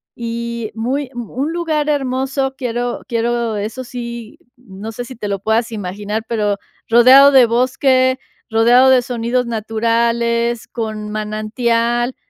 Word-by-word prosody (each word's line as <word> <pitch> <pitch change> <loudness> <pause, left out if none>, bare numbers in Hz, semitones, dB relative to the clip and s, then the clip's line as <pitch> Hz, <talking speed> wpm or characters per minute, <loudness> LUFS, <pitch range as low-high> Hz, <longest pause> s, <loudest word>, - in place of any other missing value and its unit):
y 235 -1 -4
muy 255 +4 -2
un 245 +5 -4
lugar 315 -3 -1
hermoso. 270 -1 -1
Quiero 245 -1 -3
quiero, 235 -1 -1
eso 220 +5 -4
sí, 235 -2 -8 0.2
no 220 -3 -9
sé 245 - -5
si 250 0 -11
te 210 - -4
lo 200 -1 -2
puedas 225 +3 0
imaginar 205 +2 -4
pero, 210 -3 0 0.3
rodeado 255 +4 +7
de 255 -3 +7
bosque, 255 +2 +2 0.3
rodeado 240 +4 +5
de 260 -1 +5
sonidos 245 0 -1
naturales, 235 +1 0
con 215 -2 -5
manantial. 230 +3 -1
235 Hz, 125 wpm, -17 LUFS, 225-255 Hz, 0.3 s, rodeado